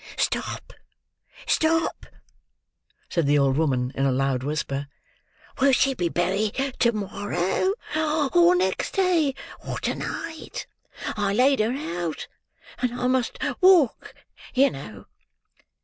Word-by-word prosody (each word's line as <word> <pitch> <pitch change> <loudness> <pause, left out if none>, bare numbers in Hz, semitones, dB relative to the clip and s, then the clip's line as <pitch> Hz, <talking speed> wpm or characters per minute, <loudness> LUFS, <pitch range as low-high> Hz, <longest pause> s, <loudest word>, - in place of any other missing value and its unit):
"Stop, - - -2 0.7
stop!" 325 +1 +1 1.0
said 170 -5 0
the 145 +1 +4
old 135 -2 +3
woman 130 -5 +1
in 135 - -2
a 135 - +3
loud 130 0 0
whisper. 140 0 -3 0.7
"Will 270 0 +4
she 270 +2 +3
be 175 -8 -1
buried 195 +5 0 0.2
to 235 - +4
morrow, 205 - -1 0.6
or 350 +1 +6
next 360 - -1
day, 345 -8 +2 0.3
or - - -4
to - - 0
night? 320 -1 -6 0.5
I 205 -2 0
laid 265 +4 +4
her 215 +2 +2
out; 175 - -4 0.5
and 245 -1 -2
I - - -1
must 255 -1 +1 0.2
walk, 360 -9 +4 0.4
you 275 +2 +5
know. 110 -8 -9
210 Hz, 120 wpm, -24 LUFS, -, 1.0 s, or